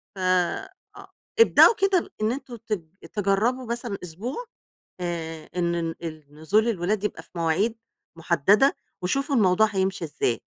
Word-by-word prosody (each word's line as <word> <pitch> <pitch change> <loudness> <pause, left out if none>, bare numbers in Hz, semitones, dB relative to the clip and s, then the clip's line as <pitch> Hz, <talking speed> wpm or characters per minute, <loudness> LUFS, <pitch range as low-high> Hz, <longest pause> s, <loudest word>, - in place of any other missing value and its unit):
ف - - -9
آه، 185 - +1 0.7
ابدأوا 460 0 +8
كده 390 -4 +1
إن 215 +2 +2
أنتم 260 -1 -6
ت 220 0 -4 0.4
تجرّبوا 215 +6 +1
مثلًا 235 -3 -3
أسبوع 225 - -5 0.5
آآ 165 -3 -5
إن 170 -1 0
ن 165 - -6
ال 155 -2 -6
نزول 205 +9 +2
الولاد 200 0 -1
يبقى 210 - -3
في - - -23
مواعيد 175 +7 +1 0.4
محددة، 190 - +3 0.3
وشوفوا 275 +10 0
الموضوع 215 -1 +4
هيمشي 190 -3 -1
إزاي، 125 -6 -1
195 Hz, 135 wpm, -25 LUFS, 170-235 Hz, 0.7 s, ابدأوا